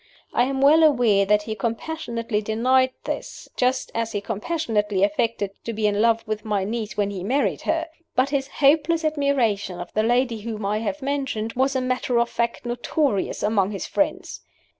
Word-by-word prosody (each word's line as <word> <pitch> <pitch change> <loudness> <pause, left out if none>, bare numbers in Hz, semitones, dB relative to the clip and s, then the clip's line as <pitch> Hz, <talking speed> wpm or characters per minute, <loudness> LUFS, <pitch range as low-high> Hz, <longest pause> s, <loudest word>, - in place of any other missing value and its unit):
I 245 - +3
am 270 0 -2
well 300 +4 +6
aware 240 -10 +4
that 210 0 +3
he 220 - -4
compassionately 230 0 -3
denied 255 +5 +2
this, - - -5
just 255 +1 0
as 230 0 -2
he 205 - 0
compassionately 210 - -1
affected 205 0 0
to 230 - -4
be 215 0 -1
in 205 0 +2
love 230 -1 +2
with 215 -1 -3
my 205 -3 0
niece 215 +1 -4
when 205 -1 +1
he 190 -3 -5
married 265 +8 0
her. 330 0 +1 0.3
But 260 +2 +3
his 275 -2 0
hopeless 315 +3 +2
admiration 255 - 0
of 175 - -8
the 215 - +2
lady 240 0 +1
whom 215 -2 -5
I 210 +2 0
have 265 +6 -3
mentioned 265 -6 -2
was 265 +2 +1
a 260 - +1
matter 255 -1 0
of 235 0 0
fact 235 +1 -2
notorious 240 -1 -1
among 205 -2 +2
his 195 -4 -4
friends. 295 - -2
230 Hz, 185 wpm, -23 LUFS, 210-270 Hz, 0.3 s, well